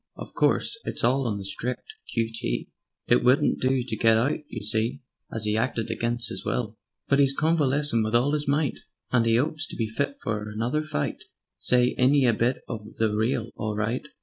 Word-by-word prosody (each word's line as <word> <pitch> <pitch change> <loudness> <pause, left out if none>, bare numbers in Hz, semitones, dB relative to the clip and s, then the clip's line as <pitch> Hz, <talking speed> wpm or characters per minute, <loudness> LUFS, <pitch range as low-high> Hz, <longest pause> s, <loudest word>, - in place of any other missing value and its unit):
Of - - -9
course 450 - +1
it's - - -5
all 130 +2 +3
on 105 -3 -1
the 100 - -6
strict 125 - -4 0.2
Q. 115 -1 0
T.; 115 - -2 0.4
It - - +3
wouldn't 125 +3 +3
do 130 -1 +2
to 120 -3 -3
get 115 -1 +4
out, 125 +6 +1
you 115 - -6
see, 110 +4 -1 0.3
As 110 -1 -3
'e 105 - +1
hacted 115 0 0
against 120 -1 -1
'is - - -5
will. 110 -3 -2 0.3
But 140 - +3
'e's 140 -1 +3
convalescin' 145 -5 +2
wiv 110 +1 0
all 130 +5 +3
'is 150 -1 -1
might, 145 0 +1 0.3
And 120 -2 +3
'e 115 +1 +4
'opes 155 +4 -1
to - - -8
be 115 - 0
fit 140 +6 -2
for 105 -1 -2
another 115 +8 -1
fight 155 - -3 0.4
Say! 125 0 +3
Ain't 130 +3 +5
'e 140 -2 +4
a 120 - +4
bit 120 +4 0
of 110 -2 -7
the 110 -2 +1
real 110 +1 0
all 105 -1 -3
right? 110 +4 -1
120 Hz, 205 wpm, -26 LUFS, 110-135 Hz, 0.4 s, Ain't